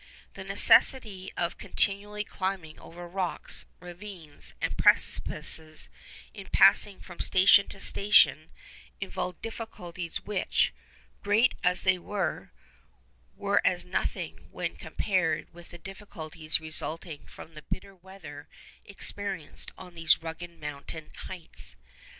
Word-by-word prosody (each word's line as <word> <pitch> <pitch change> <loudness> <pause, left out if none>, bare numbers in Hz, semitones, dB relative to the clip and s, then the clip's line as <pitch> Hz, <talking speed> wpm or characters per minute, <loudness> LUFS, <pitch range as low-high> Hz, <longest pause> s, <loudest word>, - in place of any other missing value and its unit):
The - - -8
necessity 205 -8 +5
of 170 -1 -2
continually 205 +1 +2
climbing 190 -6 -4
over 175 +1 -10
rocks, 180 0 -2
ravines, 175 -3 -7
and - - -2
precipices 155 -1 +1 0.4
in - - -10
passing 200 -2 +4
from 175 -2 -12
station 195 +2 +6
to 195 - -7
station 195 -8 +4 0.5
involved 180 -2 -5
difficulties 180 -7 -6
which, 205 -3 +1 0.5
great 215 +5 +3
as 180 0 +2
they 185 -1 +3
were, 195 +1 -3 0.8
were 200 0 +1
as 180 -1 +1
nothing 180 - -4
when - - -4
compared 175 -6 -1
with 175 0 -14
the 175 - -10
difficulties 165 -4 -3
resulting 160 0 -2
from 160 - -13
the 155 - -10
bitter 195 +5 -6
weather 175 -6 -12 0.4
experienced 195 -4 -3
on 180 -1 -12
those 165 -1 +3
rugged 165 +1 -8
mountain 150 +1 -5
heights. 180 -4 -3
180 Hz, 115 wpm, -28 LUFS, 165-195 Hz, 0.8 s, station